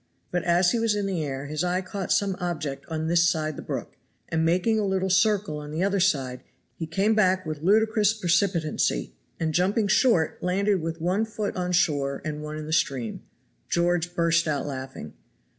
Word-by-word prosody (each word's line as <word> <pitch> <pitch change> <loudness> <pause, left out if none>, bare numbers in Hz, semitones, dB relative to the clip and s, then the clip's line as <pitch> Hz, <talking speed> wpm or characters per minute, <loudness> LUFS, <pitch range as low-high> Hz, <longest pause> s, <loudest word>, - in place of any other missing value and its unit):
But 175 -1 -1
as 175 +1 +4
he 235 - +1
was 225 -2 +1
in 205 -1 -1
the 185 -5 -1
air 135 -1 -4
his 155 +3 -2
eye 180 +1 0
caught 195 0 -5
some 200 -2 +2
object 155 -6 -4
on 160 -1 -3
this 170 +1 +4
side 155 -2 -1
the - - -7
brook, - - -6 0.3
and 160 0 0
making 185 +7 +2
a - - 0
little 190 -1 0
circle 195 -4 +2
on 150 0 -8
the 160 +4 -2
other 200 0 +1
side, 135 -9 +1 0.3
he 165 - -5
came 195 +7 +1
back 185 -3 +2
with 155 -2 -5
ludicrous 215 +3 +3
precipitancy, 175 - 0 0.3
and 160 -1 -1
jumping 200 +5 +2
short, 195 - +2
landed 195 +1 +1
with 165 +1 -4
one 185 +6 +1
foot 215 -2 -4
on 180 -1 -2
shore 145 -6 +1
and 150 -1 -4
one 150 0 -6
in 155 - -6
the 155 - -4
stream. 130 -7 0 0.5
George 175 0 +1
burst 170 -1 +2
out 145 -3 -1
laughing. 130 - -7
175 Hz, 190 wpm, -26 LUFS, 155-195 Hz, 0.5 s, as